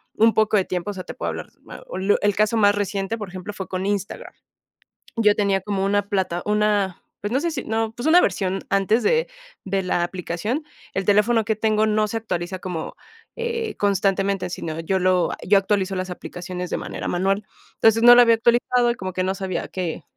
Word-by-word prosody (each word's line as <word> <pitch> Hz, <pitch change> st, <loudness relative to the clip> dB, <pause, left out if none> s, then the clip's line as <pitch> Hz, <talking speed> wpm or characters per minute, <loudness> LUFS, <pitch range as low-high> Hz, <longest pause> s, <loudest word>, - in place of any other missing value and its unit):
un 225 Hz, +1 st, +4 dB
poco 215 Hz, 0 st, +3 dB
de 190 Hz, -, +1 dB
tiempo, 180 Hz, +2 st, -3 dB
o -, -, -7 dB
sea, 185 Hz, -2 st, -7 dB
te -, -, -8 dB
puedo -, -, -4 dB
hablar, -, -, -5 dB
ma -, -, -11 dB
un 190 Hz, -, -5 dB
lu 205 Hz, -, +5 dB
el 205 Hz, -1 st, +2 dB
caso 215 Hz, +2 st, +2 dB
más 205 Hz, -2 st, +5 dB
reciente, 200 Hz, +1 st, -2 dB
por 210 Hz, -4 st, -6 dB
ejemplo, 185 Hz, +2 st, -7 dB
fue 190 Hz, -1 st, -6 dB
con 185 Hz, 0 st, -3 dB
Instagram, 200 Hz, -1 st, -3 dB, 0.8 s
yo 215 Hz, -3 st, +4 dB
tenía 200 Hz, -2 st, +1 dB
como 195 Hz, 0 st, -2 dB
una 200 Hz, 0 st, +1 dB
plata, 185 Hz, -3 st, -1 dB
una, 210 Hz, -3 st, +1 dB, 0.2 s
pues, 205 Hz, -, -3 dB
no 265 Hz, -, +3 dB
sé 335 Hz, +3 st, -1 dB
si 270 Hz, -5 st, -4 dB
no, 225 Hz, 0 st, -1 dB
pues, 240 Hz, +5 st, -3 dB
una 345 Hz, +3 st, +7 dB
versión 190 Hz, -1 st, 0 dB
antes 200 Hz, +4 st, +2 dB
de 480 Hz, +1 st, +2 dB, 0.4 s
de 195 Hz, 0 st, -1 dB
la 180 Hz, -1 st, 0 dB
aplicación, 185 Hz, -, -3 dB, 0.3 s
el 195 Hz, 0 st, -2 dB
teléfono 215 Hz, +2 st, +3 dB
que 220 Hz, 0 st, 0 dB
tengo 215 Hz, 0 st, +1 dB
no 215 Hz, 0 st, +2 dB
se 225 Hz, -, -3 dB
actualiza 185 Hz, -4 st, -4 dB
como, 180 Hz, -4 st, -5 dB, 0.4 s
eh, 465 Hz, -2 st, -3 dB
constantemente, 195 Hz, -1 st, +1 dB
sino 160 Hz, -2 st, -5 dB
yo 190 Hz, +3 st, 0 dB
lo 185 Hz, -1 st, +2 dB
a -, -, -5 dB
yo 200 Hz, +1 st, +6 dB
actualizo 195 Hz, -1 st, 0 dB
las 185 Hz, 0 st, -3 dB
aplicaciones 180 Hz, 0 st, -6 dB
de -, -, -2 dB
manera -, -, -5 dB
manual, 195 Hz, +3 st, 0 dB, 0.3 s
entonces, 225 Hz, +1 st, +3 dB
no 240 Hz, 0 st, +10 dB
lo 245 Hz, -, +8 dB
había 230 Hz, -1 st, +6 dB
actualizado 240 Hz, +1 st, +2 dB
y -, -, -4 dB
como 185 Hz, -4 st, -5 dB
que 185 Hz, -, -1 dB
no 190 Hz, +1 st, 0 dB
sabía 190 Hz, -3 st, -3 dB
que 175 Hz, -3 st, -4 dB
200 Hz, 215 wpm, -22 LUFS, 185-220 Hz, 0.8 s, no